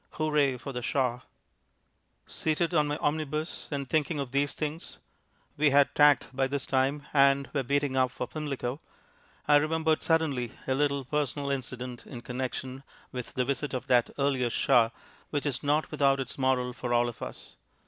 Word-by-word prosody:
"Hooray 150 -4 +1
for 135 +3 -7
the 125 - -3
Shah!" 125 -1 0 1.1
Seated 160 +2 -1
on 150 -3 +3
my 145 0 -1
omnibus, 155 +1 -2
and 140 -2 -3
thinking 155 +1 0
of 135 -3 -4
these 140 +1 0
things 155 +2 -4 0.6
(we 150 0 +4
had 140 0 +4
tacked 145 -2 +4
by 135 0 +2
this 140 0 -3
time, 135 +2 0
and 140 -1 +4
were 140 - +1
beating 140 +1 0
up 130 -1 +3
for 125 - -4
Pimlico) 140 -3 -4 0.7
I 145 - +7
remembered 160 +1 +1
suddenly 145 -8 +1
a 130 - +1
little 140 -1 0
personal 145 0 -1
incident 125 -2 -5
in 120 - -8
connexion 130 +1 -4 0.3
with 125 -2 -6
the 125 - +1
visit 140 +1 -2
of 125 -1 -4
that 125 -3 +3
earlier 135 -3 +1
Shah 115 0 +4 0.4
which 145 -1 -2
is 135 -3 -1
not 150 +2 +1
without 140 -2 +3
its 130 -2 -4
moral 130 -2 +1
for 120 -1 -2
all 120 0 +3
of 120 - -7
us. - - -8
140 Hz, 170 wpm, -29 LUFS, 130-150 Hz, 1.1 s, I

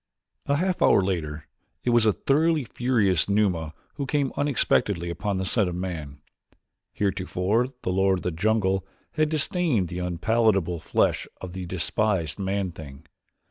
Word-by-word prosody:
A 140 - +2
half 180 +4 0
hour 95 - +5
later 80 -5 -3 0.4
it 125 - +1
was 120 -2 +4
a - - +6
thoroughly 155 - +2
furious 110 - +1
Numa 90 -7 +1 0.2
who 140 -2 -3
came 140 -1 0
unexpectedly 100 -10 +1
upon 100 +3 -2
the 95 - -2
scent 100 -1 +2
of 85 - -5
man. 80 -6 -5 0.7
Heretofore 100 +3 0 0.2
the 90 - -1
lord 95 0 +2
of - - -8
the 90 - -1
jungle 95 +2 +1 0.3
had 155 -1 +1
disdained 155 - +1
the 90 - -5
unpalatable 90 0 +1
flesh 80 - 0
of 90 -2 -8
the 95 -1 -5
despised 95 0 -1
man 95 -1 -1
thing. 75 -2 -11
95 Hz, 150 wpm, -25 LUFS, 90-120 Hz, 0.7 s, a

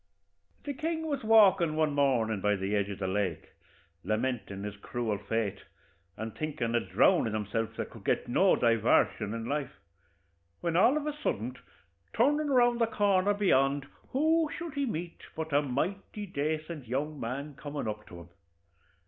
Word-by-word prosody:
The 285 - -3
king 320 +3 -2
was 290 -5 -2
walkin' 200 -7 +5
one 155 -2 +1
mornin' 120 -7 +1
by 105 +1 +2
the 95 +2 -1
edge 100 -1 0
of 100 - -5
the 95 - -2
lake, 95 0 -2 0.5
lamentin' 110 -2 -2
his 105 -1 -5
cruel 110 -1 -3
fate, 105 -1 -2 0.6
and 110 0 -5
thinkin' 145 -7 -2
o' - - +4
drownin' 110 -1 +3
himself, 110 +1 -2
that - - -4
could - - -12
get - - 0
no 185 +10 +4
divarshun 115 -3 +2
in 115 0 -4
life, 140 +1 -2 0.9
when 170 -1 -1
all 240 - +5
of 300 - -3
a 300 - -1
suddint, 125 - -3 0.6
turnin' 295 +6 +2
round 240 -3 +4
the 230 - +4
corner 205 -2 +2
beyant, 140 -8 +2 0.2
who 315 +3 +2
should 340 -4 -6
he 280 -1 -1
meet 170 -5 -5
but 160 -1 -4
a 145 - +5
mighty 185 +10 -3
dacent 155 -3 -3
young 145 +5 -2
man 140 +6 -4
comin' 145 -2 -5
up 105 0 -5
to 85 -2 -10
him. 85 - -14
145 Hz, 165 wpm, -30 LUFS, -, 0.9 s, walkin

